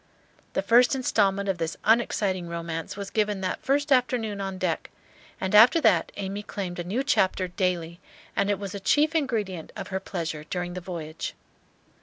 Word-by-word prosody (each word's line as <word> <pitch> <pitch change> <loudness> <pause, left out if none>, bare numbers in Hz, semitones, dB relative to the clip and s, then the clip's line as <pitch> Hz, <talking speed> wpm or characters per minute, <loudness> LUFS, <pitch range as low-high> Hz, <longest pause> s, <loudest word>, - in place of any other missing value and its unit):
The - - 0
first 240 +6 +5
instalment 200 -6 +1
of 190 -3 -1
this 165 -1 -2
un 225 +2 +5
exciting 190 -6 -2
romance 170 +1 -5
was 200 -1 -6
given 210 -2 0
that 185 -1 -2
first 285 +1 0
afternoon 240 -5 +2
on 195 -1 -4
deck; 180 -3 -2 0.5
and 190 +1 -2
after 230 +10 +8
that, - - +3
Amy 200 0 -3
claimed 190 -4 -5
a - - -2
new 210 +10 -1
chapter 190 -7 +2
daily, 175 -2 -2 0.4
and 200 0 +1
it 205 - +2
was 195 -1 -6
a 200 - -4
chief 300 +10 +3
ingredient 215 - -1
of - - -6
her 190 -1 -2
pleasure 165 -5 -4
during 175 +2 -4
the 180 - -5
voyage. 165 -3 -6
195 Hz, 180 wpm, -26 LUFS, 175-220 Hz, 0.5 s, after